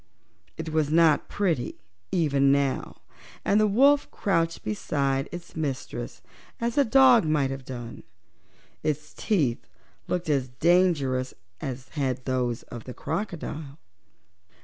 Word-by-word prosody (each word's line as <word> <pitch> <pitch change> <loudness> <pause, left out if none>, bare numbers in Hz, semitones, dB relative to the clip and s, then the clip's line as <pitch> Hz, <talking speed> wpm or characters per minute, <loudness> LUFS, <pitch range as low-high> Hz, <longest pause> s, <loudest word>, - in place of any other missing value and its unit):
It 160 0 -4
was 155 -2 +1
not 160 -1 +4
pretty 170 -11 -1 0.4
even 140 -5 +3
now, 140 -1 0 0.4
and 205 - +4
the 215 - +4
wolf 275 +7 +4
crouched 165 -4 0
beside 135 +5 -1
its 175 0 -9
mistress 135 -5 -4 0.4
as 235 0 -1
a 285 - +5
dog 255 -2 +6
might 150 -4 +1
have 135 -1 -6
done. 120 -3 -7 0.8
Its 150 -3 -2
teeth 145 - 0 0.4
looked 180 -1 -2
as 140 -4 +1
dangerous 140 -3 +2 0.3
as 130 -1 -5
had 130 -4 -2
those 125 -3 -1
of 120 -2 -9
the 125 - -8
crocodile. 160 -7 -4
150 Hz, 125 wpm, -26 LUFS, 130-175 Hz, 0.8 s, dog